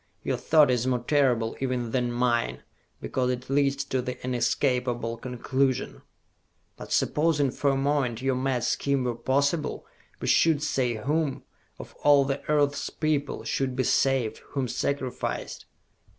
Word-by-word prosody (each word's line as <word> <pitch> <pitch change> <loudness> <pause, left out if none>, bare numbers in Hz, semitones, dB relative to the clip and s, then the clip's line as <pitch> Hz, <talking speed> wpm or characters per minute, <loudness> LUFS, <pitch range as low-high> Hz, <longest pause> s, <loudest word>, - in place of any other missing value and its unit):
Your - - -1
thought 150 -4 +4
is 125 0 0
more 125 -2 0
terrible 125 -6 +2
even 125 -3 -2
than 125 -1 0
mine, 120 -1 0 0.4
because 125 -1 -1
it 125 +1 -4
leads 140 0 +2
to 130 -2 -1
this 125 0 -5
inescapable 125 -2 0
conclusion!" 130 +2 -1 0.7
"But - - -10
supposing 150 -3 +2
for 140 - 0
a 135 - +2
moment 135 -4 0
your 135 +1 0
mad 130 -2 -1
scheme 140 +2 0
were 125 -1 -1
possible, 140 +6 0 0.3
who - - -5
should 155 -3 +3
say 130 -6 0
whom, 145 +5 -1 0.3
of - - -10
all 145 -2 +5
the 135 +1 -2
earth's 145 -1 +1
people, 150 -2 -1
should 130 -2 -1
be 130 - +1
saved, 130 -2 +1
whom 135 -3 -1
sacrificed?" 130 +1 -3
130 Hz, 145 wpm, -26 LUFS, 125-140 Hz, 0.7 s, all